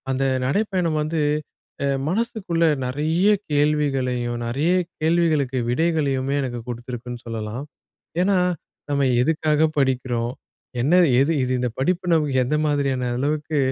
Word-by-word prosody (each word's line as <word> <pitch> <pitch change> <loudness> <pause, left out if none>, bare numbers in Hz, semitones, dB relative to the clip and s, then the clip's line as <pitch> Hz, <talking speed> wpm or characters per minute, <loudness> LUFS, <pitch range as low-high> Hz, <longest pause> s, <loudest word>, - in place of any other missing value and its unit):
அந்த 135 0 0 0.2
நடைப்பயணம் 180 0 0
வந்து, 155 +1 -1 0.6
அ - - +1 0.2
மனசுக்குள்ள 185 -3 0 0.2
நெறைய 155 +8 0 0.3
கேள்விகளையும், 135 -5 +1
நெறைய 140 +9 0 0.3
கேள்விகளுக்கு 155 -5 +1
விடைகளையுமே 140 -2 +1
எனக்கு 125 -3 -3
குடுத்திருக்குன்னு 120 0 -6
சொல்லலாம். 115 +2 -5 0.6
ஏன்னா, 195 +1 +3 0.5
நம்ம 140 -1 +1 0.2
எதுக்காக 155 +2 +2
படிக்கிறோம்? 125 -3 0 0.5
என்ன 150 +8 +3 0.2
எது 140 +4 +3
இது 130 - -1
இந்த 125 0 0
படிப்பு 180 +6 0
நமக்கு 150 -4 +1
எந்த 130 +5 0
மாதிரியான 140 -4 0
அளவுக்கு 150 +3 -1
145 Hz, 115 wpm, -22 LUFS, 125-160 Hz, 0.6 s, ஏன்னா